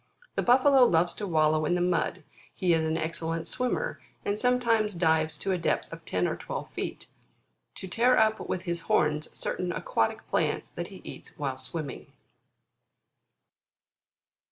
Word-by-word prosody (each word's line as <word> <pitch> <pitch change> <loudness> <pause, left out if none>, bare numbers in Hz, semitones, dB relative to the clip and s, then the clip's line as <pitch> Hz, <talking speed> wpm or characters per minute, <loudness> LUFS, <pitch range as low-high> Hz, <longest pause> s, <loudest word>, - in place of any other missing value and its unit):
The - - 0
Buffalo 260 +2 +6
loves 175 -4 +3
to 205 - -4
wallow 155 -2 +3
in 175 +3 +1
the - - +1
mud; 175 -1 0 0.3
he 180 -3 +2
is 160 -1 +2
an 160 0 0
excellent 165 0 -3
swimmer, 360 - -2 0.2
and 205 +1 -1
sometimes 230 -5 +2
dives 160 -2 +2
to 195 - -2
a 185 - 0
depth 165 - -1
of 165 0 -10
ten 90 -1 0
or - - -1
twelve - - -6
feet, - - -5 0.7
to 190 - -6
tear 245 +6 +3
up 220 0 +3
with 185 - -2
his 170 -2 -2
horns 150 0 +2
certain 180 -1 -2
aquatic 115 -8 -1
plants - - 0
that - - -5
he - - -12
eats - - -10
while 135 -3 -3
swimming. 145 +3 -5
170 Hz, 155 wpm, -28 LUFS, 160-215 Hz, 0.7 s, Buffalo